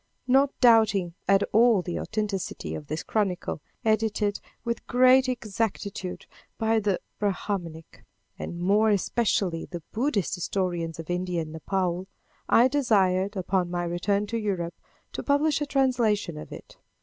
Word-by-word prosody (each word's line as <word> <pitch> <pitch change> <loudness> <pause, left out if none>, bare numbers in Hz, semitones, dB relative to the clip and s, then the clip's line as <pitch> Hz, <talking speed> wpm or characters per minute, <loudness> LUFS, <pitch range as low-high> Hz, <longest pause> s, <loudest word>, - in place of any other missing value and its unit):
Not 270 +2 +4
doubting 215 -7 +4
at 195 0 +4
all 225 -3 +5
the 175 - -3
authenticity 210 -3 -3
of 150 - -7
this 155 +1 -3
chronicle, 190 -7 -1 0.2
edited 215 -1 +1 0.3
with 235 0 -3
great 255 +1 +5
exactitude 210 -5 -3 0.3
by 225 0 +2
the 200 -3 0 0.2
Brahminic, 185 -5 -3 0.4
and 170 - -5
more 205 +5 +3
especially 200 -4 0
the 175 -3 -8
Buddhistic 225 - 0
historians 175 -3 -2
of 165 +1 -6
India 180 -1 -1
and 155 - -9
Nepaul, 180 +2 -2 0.4
I 240 +2 +6
desired, 205 -8 +2
upon 185 -1 0
my 175 0 -2
return 195 +4 0
to 230 +2 -3
Europe, 185 -5 -2 0.4
to - - -4
publish 290 +1 +2
a 295 - -1
translation 240 - +1
of 150 - -9
it. - - -11
200 Hz, 135 wpm, -26 LUFS, 180-225 Hz, 0.4 s, I